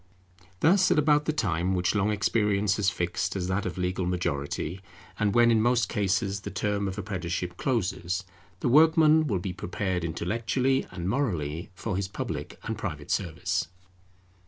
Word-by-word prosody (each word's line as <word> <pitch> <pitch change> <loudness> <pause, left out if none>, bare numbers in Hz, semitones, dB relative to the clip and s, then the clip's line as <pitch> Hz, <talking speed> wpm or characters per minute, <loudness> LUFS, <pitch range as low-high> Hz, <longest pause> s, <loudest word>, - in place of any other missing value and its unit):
Thus, 185 +3 +5
at - - +3
about 150 0 +4
the - - +1
time 95 - 0
which 90 0 +1
long 105 0 +1
experience 105 -1 +1
has 100 -2 +2
fixed 90 0 -2
as 95 -2 -2
that 95 +1 0
of 90 - -5
legal 90 0 -1
majority, 85 0 -2 0.4
and 105 -2 +1
when 120 0 +6
in 110 -1 +4
most 120 +1 +2
cases 100 -1 0
the - - -5
term 100 -1 -1
of 95 +1 -4
apprenticeship 90 -3 -3
closes, 95 -6 -1 0.4
the - - 0
workman 155 +3 +5
will 105 -7 0
be 90 +1 -4
prepared 95 0 -2
intellectually 115 - 0
and 90 -1 -5
morally 90 - -1
for 105 +2 -3
his 100 -1 -1
public 95 - -5
and - - -4
private - - -5
service. 90 0 -1
100 Hz, 160 wpm, -27 LUFS, 90-115 Hz, 0.4 s, when